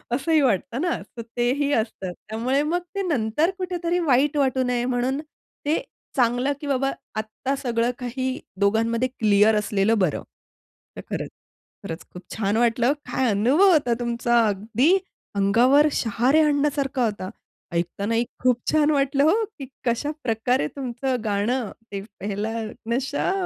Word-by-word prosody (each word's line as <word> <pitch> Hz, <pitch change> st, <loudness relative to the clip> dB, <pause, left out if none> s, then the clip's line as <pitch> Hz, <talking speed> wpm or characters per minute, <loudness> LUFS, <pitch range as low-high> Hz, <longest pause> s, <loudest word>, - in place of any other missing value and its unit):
असंही 315 Hz, +3 st, +2 dB
वाटतं 250 Hz, -, 0 dB
ना, 350 Hz, -1 st, +1 dB, 0.2 s
तर -, -, -3 dB, 0.2 s
तेही 275 Hz, +4 st, +1 dB
असतं. 215 Hz, -5 st, -1 dB, 0.2 s
त्यामुळे 250 Hz, +6 st, 0 dB
मग 340 Hz, +4 st, 0 dB, 0.2 s
ते 395 Hz, -, 0 dB
नंतर 295 Hz, -, +1 dB
कुठेतरी 355 Hz, -1 st, -1 dB
वाईट 290 Hz, -1 st, +2 dB
वाटू 260 Hz, -2 st, +2 dB
नये 245 Hz, -1 st, 0 dB
म्हणून 255 Hz, +2 st, 0 dB, 0.5 s
ते 305 Hz, +2 st, +1 dB, 0.3 s
चांगलं 250 Hz, +2 st, +2 dB
की 290 Hz, -, -5 dB
बाबा 270 Hz, 0 st, +1 dB, 0.2 s
आत्ता 220 Hz, +5 st, -3 dB
सगळं 235 Hz, -2 st, 0 dB
काही 255 Hz, +1 st, -3 dB, 0.2 s
दोघांमध्ये 230 Hz, +4 st, +2 dB
क्लिअर 210 Hz, 0 st, +4 dB
असलेलं 210 Hz, +1 st, +1 dB
बरं. 180 Hz, -6 st, 0 dB, 0.7 s
तर -, -, -6 dB
खरंच, -, -, -3 dB, 0.5 s
खरंच 165 Hz, 0 st, -6 dB
खूप 180 Hz, -, -8 dB
छान 210 Hz, 0 st, 0 dB
वाटलं 240 Hz, +3 st, +3 dB, 0.2 s
काय 255 Hz, -3 st, +1 dB
अनुभव 275 Hz, -, +4 dB
होता 280 Hz, -7 st, +3 dB
तुमचा 235 Hz, -1 st, +2 dB
अगदी 225 Hz, -, +2 dB, 0.4 s
अंगावर 245 Hz, +9 st, +5 dB
शहारे 250 Hz, +7 st, +2 dB
आणण्यासारखा 285 Hz, -4 st, +1 dB
होता. 205 Hz, -3 st, -3 dB, 0.4 s
ऐकतानाही 200 Hz, +7 st, 0 dB, 0.2 s
खूप 250 Hz, -1 st, +2 dB
छान 310 Hz, -1 st, +3 dB
वाटलं 280 Hz, -1 st, +2 dB
हो, 415 Hz, +9 st, +4 dB, 0.2 s
की 270 Hz, -, -5 dB, 0.2 s
कशाप्रकारे 245 Hz, -, 0 dB
तुमचं 260 Hz, -1 st, -2 dB
गाणं, 215 Hz, +3 st, 0 dB, 0.2 s
ते 200 Hz, -1 st, -4 dB, 0.2 s
पहला 205 Hz, +2 st, -3 dB, 0.4 s
नशा 275 Hz, +7 st, 0 dB
245 Hz, 135 wpm, -24 LUFS, 220-280 Hz, 0.7 s, अंगावर